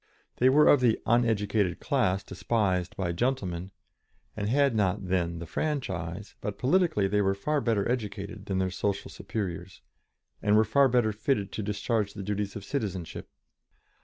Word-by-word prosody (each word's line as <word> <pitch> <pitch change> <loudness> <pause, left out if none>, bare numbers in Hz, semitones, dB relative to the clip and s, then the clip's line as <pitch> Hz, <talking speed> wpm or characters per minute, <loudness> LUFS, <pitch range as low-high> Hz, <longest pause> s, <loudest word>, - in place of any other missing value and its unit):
They 130 - +5
were 150 +3 +6
of 145 - +7
the 120 -3 +3
"uneducated" 105 -5 +2
class 95 +2 +1
despised 95 -2 -1
by 90 -3 -1
"gentlemen," 95 -5 -1 0.7
and 105 -1 -2
had 140 +1 +3
not 100 -2 0
then 85 -2 0
the 85 - -6
franchise, 95 - -3
but 105 -2 -4
politically 155 - +2
they 105 +1 +1
were 95 -1 +2
far 150 +9 0
better 110 -5 +1
educated 105 -3 -4
than 95 - -1
their 95 0 0
social 100 +2 -2
superiors, 95 -4 -5 0.6
and 105 0 +3
were 110 - +5
far 140 +5 +4
better 120 -3 +2
fitted 105 -2 -1
to - - -4
discharge 105 0 -1
the 100 - -5
duties 105 0 -2
of 100 - -7
citizenship. 100 - -4
105 Hz, 160 wpm, -28 LUFS, 95-120 Hz, 0.7 s, of